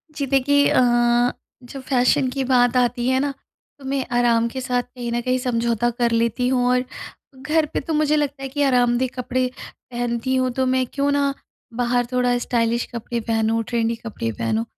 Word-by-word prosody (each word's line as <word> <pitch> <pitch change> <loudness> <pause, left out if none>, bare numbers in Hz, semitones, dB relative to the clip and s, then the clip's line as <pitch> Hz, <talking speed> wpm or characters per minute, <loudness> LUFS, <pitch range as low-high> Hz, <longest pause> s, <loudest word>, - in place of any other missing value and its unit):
जी, 285 - -2
देखिए 285 +2 +3
अ, - - +4 0.8
जब 265 +2 -9
फैशन 260 +1 +3
की 270 +1 -2
बात 250 -1 +3
आती 245 0 +1
है 260 0 +2
न? 285 +1 0 0.5
तो 275 - -13
मैं 270 0 -1
आराम 235 -1 +3
के 260 +2 -5
साथ 250 -1 0
कहीं 245 -1 -7
न 240 0 -1
कहीं 255 +1 0
समझौता 235 -2 0
कर 240 -1 +2
लेती 230 +2 +1
हूँ 250 -1 +1
और 250 0 +2 0.6
घर 310 +3 +1
पे - - 0
तो 320 - -4
मुझे 305 0 +2
लगता 285 -2 -2
है 270 - -4
कि 290 +2 -1
आरामदेह 250 -1 +2
कपड़े 255 0 -1 0.5
पहनती 240 +1 -1
हूँ, 255 0 +1
तो 260 +2 -1
मैं 260 0 +1
क्यों 280 0 +1
ना 280 -1 +1 0.4
बाहर 245 +1 0
थोड़ा 250 -1 +2
स्टाइलिश 235 -1 0
कपड़े 235 0 -4
पहनूँ, 225 0 0
ट्रेंडी 230 0 -1
कपड़े 220 - -5
पहनूँ, 110 +1 -1
250 Hz, 185 wpm, -22 LUFS, 235-265 Hz, 0.8 s, अ